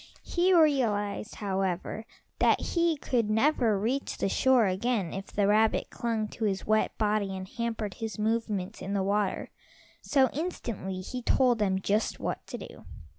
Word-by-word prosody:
He 360 +2 +1
realized, 230 - +2
however, 195 +2 -2 0.3
that - - +4
he 335 -2 +1
could 235 -6 0
never 225 -1 +3
reach 245 +8 -2
the - - 0
shore 260 +1 +4
again 195 0 0
if 195 0 -5
the 205 - 0
rabbits 215 +2 +3
clung 225 -2 -2
to 225 - -3
his 195 -2 -1
wet 215 0 +1
body 210 -3 0
and 185 0 -6
hampered 225 -2 -3
his 225 +2 -5
movements 215 -3 -1
in 195 - -4
the 195 - +1
water, 200 0 -1 0.5
so 270 -2 +3
instantly 230 - -4
he 250 +7 -5
told 245 -1 +3
them 190 -2 +1
just 210 +3 0
what - - -4
to - - -5
do. - - -11
215 Hz, 160 wpm, -28 LUFS, 195-245 Hz, 0.5 s, that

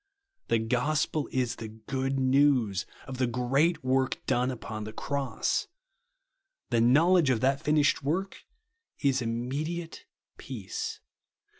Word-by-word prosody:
The - - +3
gospel 135 +6 0
is 125 -2 -1
the 110 - -6
good 130 +5 -3
news 130 -7 +3 0.2
of 130 -1 -7
the 130 - +2
great 135 +7 +1
work 130 0 +1
done 125 +1 +1
upon 110 -4 -5
the 110 +1 -7
cross. 140 0 -1 1.0
The 115 -1 +3
knowledge 155 +6 +5
of 125 -4 +2
that 135 +1 +2
finished 150 -1 +3
work 180 +8 -2 0.6
is 135 -2 +1
immediate 140 +9 -3 0.3
peace. 110 -8 -5
130 Hz, 120 wpm, -28 LUFS, 120-145 Hz, 1.0 s, knowledge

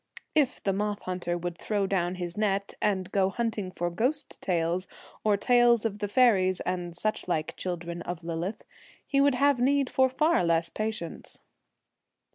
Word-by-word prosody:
If 290 -4 +1
the 195 - +1
moth 205 +1 -1
hunter 180 -1 -2
would 175 0 -5
throw 205 -2 0
down 185 -2 0
his 175 -1 -5
net, 200 -2 0
and 190 -3 0
go 195 -1 +2
hunting 220 -3 -2
for 175 -1 -3
ghost 255 - -1
tales 175 0 0 0.4
or 210 -2 +3
tales 240 +1 +4
of 210 -2 -2
the 205 - -1
faeries 195 -5 +4
and 175 -1 -3
such 215 +3 -2
like 160 -3 -1
children 175 -1 -4
of 175 0 -5
Lillith, 170 +4 -4 0.4
he 275 0 +2
would 280 -2 +4
have 280 0 +3
need 275 +1 +2
for 260 0 +4
far 305 - +2
less 165 0 +2
patience. 215 -6 -4
195 Hz, 165 wpm, -28 LUFS, 175-235 Hz, 0.4 s, tales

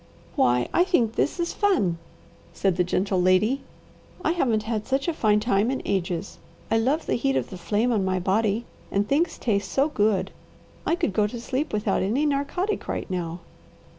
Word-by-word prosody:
"Why 125 0 +3
I 350 - +5
think 265 - +2
this 305 - 0
is 340 0 -1
fun," 205 - +1 0.5
said 195 -3 +1
the 180 - +2
gentle 185 +1 0
lady. 185 +9 +3 0.6
"I 320 - +3
haven't 240 -11 +1
had 220 -1 -3
such 270 +3 0
a 340 - +1
fine 210 -7 +3
time 210 0 +1
in 265 - -1
ages. 180 -1 -2 0.3
I 225 - +4
love 270 +8 +1
the - - -1
heat 270 +3 +1
of - - -1
the - - -6
flame 215 +7 +1
on 215 -4 +1
my 185 0 0
body 210 +4 +1 0.2
and 200 +1 0
things 315 +7 +1
taste 200 -4 -1
so 275 +3 +2
good. 205 -7 +1 0.6
I 335 - +3
could 275 - -1
go 210 +1 +2
to 235 +3 -6
sleep 260 +5 -2
without 210 -1 0
any 235 +10 +1
narcotic, 300 +8 -1
right - - -3
now." 175 -1 -3
215 Hz, 190 wpm, -25 LUFS, 195-275 Hz, 0.6 s, I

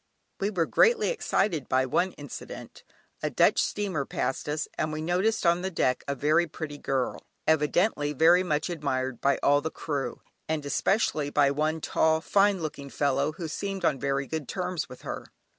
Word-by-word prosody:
We 200 - 0
were 180 -6 0
greatly 465 - +4
excited 195 - 0
by 130 0 +3
one 180 +8 +1
incident. 145 -3 -9 0.4
A - - 0
Dutch - - +4
steamer 195 -8 -1
passed 135 +1 -3
us, 150 +1 -1
and 155 - -1
we 155 - -4
noticed 180 +7 0
on 170 +1 +4
the 190 - -2
deck 130 -8 0
a 140 - -1
very 155 +5 +2
pretty 150 -2 -7
girl, 135 -2 -1 0.2
evidently 155 0 +2
very 165 +5 +5
much 155 -4 0
admired 130 -7 -2
by 140 - +3
all 145 +1 +4
the 160 - -2
crew, 145 -4 -4 0.3
and 155 -2 -1
especially 150 -1 +1
by 140 -1 +3
one 155 +3 -1
tall 160 +1 +2
fine 195 +1 +2
looking 140 -2 -5
fellow 145 +2 0
who 165 0 -5
seemed 195 +3 -3
on 145 -4 +2
very 140 +1 0
good 155 -2 -4
terms 180 -5 -3
with 125 - -12
her. - - -5
155 Hz, 175 wpm, -27 LUFS, 140-180 Hz, 0.4 s, very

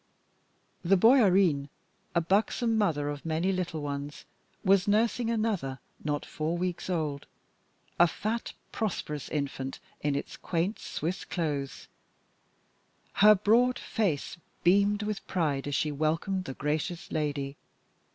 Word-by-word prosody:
The 190 +3 +4
Bäuerin, 190 - +5 0.5
a 170 - +4
buxom 220 +6 +1
mother 160 -9 +1
of 145 -1 -4
many 165 +4 0
little 175 -5 -2
ones, 145 0 -5 0.4
was 195 0 +4
nursing 225 +3 +2
another 215 - -1 0.3
not 145 -1 -1
four 160 +3 -2
weeks 180 0 -3
old, 155 -5 -2 0.7
a 175 - +8
fat, 220 +7 -3 0.2
prosperous 150 -9 -3
infant 140 -3 -3 0.2
in 145 -1 0
its 140 - -4
quaint 175 +5 -1
Swiss 170 +5 -3
clothes. 145 -5 -3 1.3
Her 210 +1 +7
broad 235 +5 +3
face 180 -8 -1 0.3
beamed 200 +3 +4
with 210 -1 -4
pride 145 -7 0
as 145 - -1
she 150 - +1
welcomed 165 +6 -1
the 135 - -6
gracious 155 +5 -2
lady. 145 -2 -2
170 Hz, 120 wpm, -29 LUFS, 145-200 Hz, 1.3 s, a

